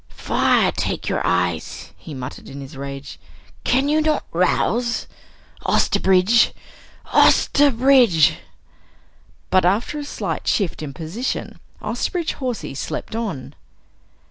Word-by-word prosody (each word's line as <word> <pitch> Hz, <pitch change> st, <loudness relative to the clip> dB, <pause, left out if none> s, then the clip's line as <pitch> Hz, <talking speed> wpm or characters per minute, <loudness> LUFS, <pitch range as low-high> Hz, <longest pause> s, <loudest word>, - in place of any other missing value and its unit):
Fire -, -, +2 dB
take -, -, -3 dB
your -, -, 0 dB
eyes!" 90 Hz, -2 st, -1 dB
he 155 Hz, -, -10 dB
muttered 130 Hz, +1 st, -8 dB
in 140 Hz, -, -8 dB
his 135 Hz, 0 st, -9 dB
rage, 140 Hz, 0 st, -7 dB, 0.4 s
"can 265 Hz, +3 st, +2 dB
you 305 Hz, +1 st, +2 dB
not 305 Hz, -1 st, 0 dB
rouse? 235 Hz, +7 st, +1 dB, 0.6 s
Osterbridge! 190 Hz, +5 st, +3 dB, 0.6 s
Osterbridge!" 255 Hz, -, +5 dB, 1.1 s
But 185 Hz, -, +4 dB
after 205 Hz, +11 st, +1 dB
a -, -, -4 dB
slight 285 Hz, -, -4 dB
shift 190 Hz, -7 st, 0 dB
in 150 Hz, -2 st, -5 dB
position, 175 Hz, -, -4 dB, 0.2 s
Osterbridge 345 Hz, -4 st, -2 dB
Hawsey 250 Hz, -, -4 dB
slept 140 Hz, +9 st, -5 dB
on. 215 Hz, -, -4 dB
200 Hz, 110 wpm, -21 LUFS, -, 1.1 s, Osterbridge